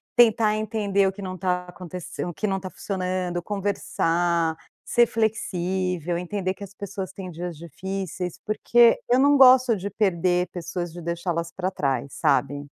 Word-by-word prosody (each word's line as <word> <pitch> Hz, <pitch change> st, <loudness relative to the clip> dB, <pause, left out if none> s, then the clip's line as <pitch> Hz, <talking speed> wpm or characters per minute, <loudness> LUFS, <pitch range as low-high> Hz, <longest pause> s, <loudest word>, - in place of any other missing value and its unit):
tentar 225 Hz, -3 st, +5 dB
entender 205 Hz, -3 st, +1 dB
o -, -, +1 dB
que 200 Hz, +1 st, -10 dB
não 185 Hz, -1 st, -5 dB
está 180 Hz, 0 st, -1 dB
acontece 180 Hz, -1 st, -7 dB
o 175 Hz, -, -5 dB
que 215 Hz, -, -2 dB
não 195 Hz, -1 st, 0 dB
está 190 Hz, 0 st, -6 dB
funcionando, 185 Hz, -2 st, -2 dB
conversar, 175 Hz, -4 st, 0 dB, 0.3 s
ser 240 Hz, -, +4 dB
flexível, 185 Hz, -6 st, -1 dB
entender 185 Hz, +1 st, -2 dB
que 200 Hz, -, -10 dB
as 200 Hz, -, -10 dB
pessoas 195 Hz, -2 st, -6 dB
têm 190 Hz, -2 st, -7 dB
dias 175 Hz, 0 st, -6 dB
difíceis, 180 Hz, +2 st, -5 dB
porque 230 Hz, +2 st, +4 dB
eu 250 Hz, +1 st, +4 dB
não 285 Hz, +1 st, +5 dB
gosto 255 Hz, -2 st, +7 dB
de 195 Hz, +2 st, -4 dB
perder 180 Hz, -3 st, +1 dB
pessoas, 175 Hz, 0 st, -4 dB
de 175 Hz, +1 st, -9 dB
deixá-las 170 Hz, 0 st, -2 dB
para 185 Hz, 0 st, -2 dB
trás, 135 Hz, -6 st, -1 dB
sabe? 145 Hz, +1 st, +1 dB
185 Hz, 160 wpm, -24 LUFS, 175-205 Hz, 0.3 s, gosto